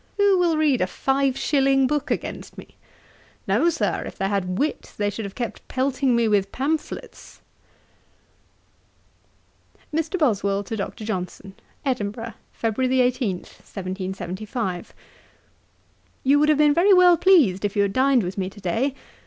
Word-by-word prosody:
Who 400 -2 +4
will 340 -3 +2
read 295 -5 +2
a 185 - +2
five 270 +6 0
shilling 270 -2 +2
book 295 +2 -1
against - - -4
me? - - -12 0.7
No, 230 - +3
Sir, 330 - -1
if - - -9
they 195 - 0
had 185 -2 -1
wit, 300 +6 -2
they 205 -1 0
should 220 0 -5
have 195 - -8
kept 235 -3 -5
pelting 260 -1 0
me 235 -1 +2
with 200 -2 +1
pamphlets.' 300 +4 -4 2.5
'MR. 325 +4 -1
BOSWELL 200 - +1
TO 225 - -5
DR. 200 - -3
JOHNSON. 190 -1 -5 0.3
'Edinburgh, 225 -3 -2 0.2
Feb. 225 +1 -3 0.2
18, 250 -5 +1
1775. 190 +1 -5 1.3
'You 280 +2 +4
would 300 +1 +3
have 305 - +4
been 295 -1 +5
very 375 +5 +5
well 360 -1 +7
pleased 300 - +4
if 205 0 -1
you 205 - +3
had 200 -1 -1
dined 260 -2 +3
with 185 +2 -4
me 185 -1 -2
to 205 - -15
day. 230 +9 -1
240 Hz, 145 wpm, -23 LUFS, 200-290 Hz, 2.5 s, well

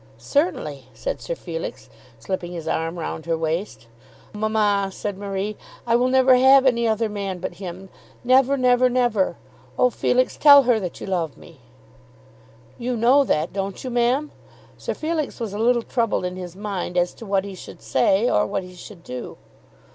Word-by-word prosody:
"Certainly," 295 +6 -1
said - - -4
Sir - - -4
Felix, 165 - -6 0.3
slipping 175 +8 -4
his 165 -2 -7
arm 165 +2 -2
round 160 -1 -5
her 165 -1 +1
waist. 160 - -3 0.5
"Mamma," 210 -2 +1
said 205 +1 -4
Marie, 200 +1 -4 0.3
"I 230 -1 +2
will 245 +1 +3
never 260 0 +5
have 265 +1 +6
any 235 -3 +3
other 220 0 +1
man 200 -3 -4
but 180 0 -5
him; 185 +1 -7 0.4
never, 265 +2 +4
never, 250 0 +4
never. 240 -6 +1 0.4
Oh, 250 - +4
Felix, 255 +2 +1
tell 285 -2 +8
her 245 -3 +3
that 180 -4 -6
you - - -5
love 170 -6 -2
me." - - -16 1.2
"You 245 0 -2
know 250 +5 +5
that, 155 - 0
don't 195 0 -4
you, 255 - -4
ma'am?" 245 +5 +1 0.4
Sir - - -5
Felix 310 -3 -3
was 225 -4 -4
a 205 - -4
little 235 +1 +2
troubled 230 -7 -1
in 180 0 -4
his 180 -1 -8
mind 195 -3 -4
as 175 0 +1
to 225 - -11
what 195 0 +1
he 200 - -7
should 180 - -12
say, 160 - +2
or - - +2
what 195 - -2
he 180 0 -12
should 180 0 -12
do. 125 -4 -7
210 Hz, 175 wpm, -22 LUFS, 180-250 Hz, 1.2 s, tell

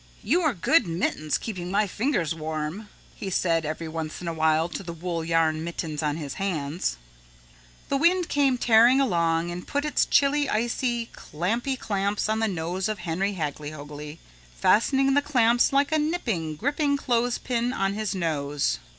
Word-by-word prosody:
"You 355 - +2
are 310 -8 +1
good, 200 - +3
mittens, 165 -2 -1
keeping 180 -6 -5
my 200 +3 +2
fingers 200 - -1
warm," 160 +6 -4 0.2
he 195 - -6
said 165 -4 +1
every 155 +1 -4
once 160 -1 -5
in 180 - -7
a 170 - -1
while 160 0 +2
to 175 - -6
the 170 -3 -7
wool 170 0 -3
yarn 160 -1 +1
mittens 165 -3 -4
on 150 -1 -1
his 145 -4 -5
hands. 160 - -2 0.9
The 275 - +1
wind 345 +3 +3
came 275 -3 +2
tearing 240 +2 +5
along 170 -8 +1
and 175 +1 -7
put 285 +1 -1
its 300 - +1
chilly, 285 0 +3
icy, 235 +1 -1
clammy 230 - -2
clamps 200 -1 -1
on 220 0 +1
the 225 - +1
nose 185 +2 -2
of 215 - -2
Henry 185 +3 -2
Hagglyhoagly, 150 -1 -6 0.4
fastening 270 - +3
the 285 - +4
clamps 245 -4 +3
like 280 +2 +2
a 315 - +3
nipping, 230 - -1
gripping 285 - 0
clothes 245 -2 0
pin 240 0 -1
on 195 -5 0
his 210 -2 -2
nose. 145 - -1
190 Hz, 165 wpm, -26 LUFS, 160-245 Hz, 0.9 s, tearing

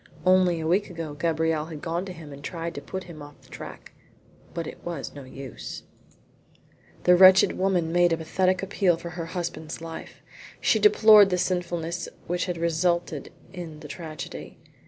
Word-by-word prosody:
Only 185 -2 +4
a 160 - -4
week 185 +6 +1
ago 165 -4 -6
Gabrielle 160 0 0
had 160 -2 -7
gone 170 +3 -3
to 190 - -6
him 160 -5 -10
and 140 0 -11
tried 170 +2 -4
to - - -6
put 190 0 -6
him 165 -4 -11
off 145 0 -12
the - - -20
track, - - -9 0.6
but 170 -1 -4
it - - -9
was 170 -5 -5
no 140 -2 -9
use. 130 -1 -8 1.2
The 180 - +6
wretched 185 +1 +7
woman 180 -4 +1
made 175 0 +4
a 165 - +2
pathetic 185 +3 0
appeal 190 -3 +2
for 170 +1 -7
her 170 -1 -5
husband's 170 -3 -5
life. 165 0 -9 0.4
She 220 - +3
deplored 210 -1 +7
the 180 - +1
sinfulness 175 -1 -2 0.2
which 175 +1 -1
had 180 -3 -3
resulted 170 -2 0 0.2
in 165 -4 -8
the 150 - -8
tragedy. 155 0 -8
170 Hz, 175 wpm, -26 LUFS, 160-180 Hz, 1.2 s, wretched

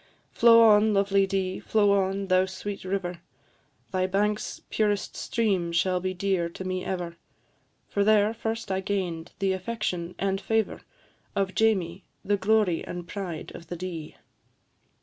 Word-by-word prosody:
Flow 230 0 +7
on, 215 -1 +5
lovely 195 0 +3
Dee, 190 -1 -1
flow 205 -2 +2
on, 195 0 +1
thou 185 0 +3
sweet 200 +1 -6
river, 185 -2 -3 0.7
Thy 185 -1 +1
banks' 210 +2 -1
purest 205 -2 0
stream 195 -7 0
shall 180 +2 +1
be 185 +1 -2
dear 185 -2 0
to 180 - -8
me 185 0 -3
ever, 175 -3 -4 0.7
For 200 - 0
there 215 +1 +4
first 225 -2 -4
I 190 - +1
gain'd 185 -4 -3
the 195 -1 +1
affection 185 -3 -3
and 195 0 -1
favour 220 -1 0 0.5
Of 195 -1 0
Jamie, 190 -4 +1 0.2
the 205 - +2
glory 200 -3 +2
and 175 -1 -7
pride 180 -5 -5
of 170 - -11
the 175 - -5
Dee. 170 -3 -6
195 Hz, 150 wpm, -27 LUFS, 180-205 Hz, 0.7 s, Flow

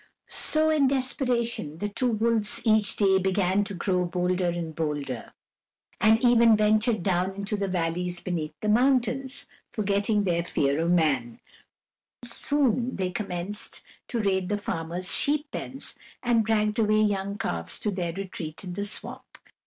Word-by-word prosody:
So, 315 0 +2
in 295 -3 +3
desperation, 245 - -1
the 205 - -2
two 230 +5 -1
wolves 225 -1 +1
each 215 -2 +3
day 190 -2 +3
began 190 +1 +1
to 200 -1 -4
grow 180 0 0
bolder 180 +1 0
and 170 -2 -4
bolder, 145 -6 -4 0.7
and 220 +1 +5
even 235 -2 +6
ventured 215 -1 +2
down 185 +1 0
into 200 +1 -2
the 200 -1 -2
valleys 175 0 -1
beneath 160 -4 -4
the 215 - -2
mountains, 255 +3 +2 0.3
forgetting 205 0 +1
their 170 -3 0
fear 140 -3 0
of 165 - 0
man; 140 -9 +1 0.8
soon 250 0 +2
they 185 -1 -2
commenced 185 +1 -3 0.2
to 240 - -2
raid 190 -3 0
the 205 - 0
farmers' 180 -2 -2
sheep 295 +1 +1
pens, 270 +1 -4 0.3
and 235 -3 +2
dragged 215 0 +1
away 215 -1 +3
young 200 -1 -1
calves 85 - -1
to 210 - 0
their 180 -3 -2
retreat 175 -3 -6
in 180 -2 -6
the 200 +3 -3
swamp. 205 - -7
200 Hz, 150 wpm, -26 LUFS, 175-225 Hz, 0.8 s, even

